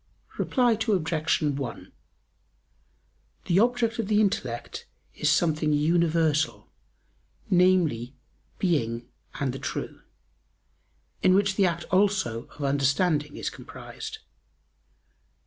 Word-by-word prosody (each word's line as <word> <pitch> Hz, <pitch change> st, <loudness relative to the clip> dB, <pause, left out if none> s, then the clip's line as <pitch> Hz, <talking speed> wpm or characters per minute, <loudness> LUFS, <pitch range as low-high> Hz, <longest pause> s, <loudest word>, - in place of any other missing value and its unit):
Reply 250 Hz, -3 st, +2 dB
Obj. 180 Hz, -10 st, 0 dB
1: 140 Hz, -4 st, -3 dB, 1.5 s
The 180 Hz, +2 st, +3 dB
object 235 Hz, 0 st, +1 dB
of 220 Hz, -, -1 dB
the 210 Hz, 0 st, +3 dB
intellect 190 Hz, -, -2 dB, 0.3 s
is -, -, 0 dB
something 155 Hz, -2 st, +2 dB
universal, 160 Hz, 0 st, +1 dB, 0.8 s
namely, 175 Hz, -9 st, +3 dB, 0.4 s
being 120 Hz, -, 0 dB, 0.3 s
and 135 Hz, -3 st, -1 dB
the 135 Hz, -, -6 dB
true, -, -, -5 dB, 1.2 s
in 185 Hz, -, +5 dB
which 200 Hz, 0 st, +3 dB
the 195 Hz, -2 st, +4 dB
act 170 Hz, -1 st, -2 dB
also 185 Hz, -, +1 dB
of 145 Hz, -, -9 dB
understanding 145 Hz, +2 st, +1 dB
is -, -, -3 dB
comprised. -, -, -9 dB
165 Hz, 95 wpm, -26 LUFS, 145-195 Hz, 1.5 s, in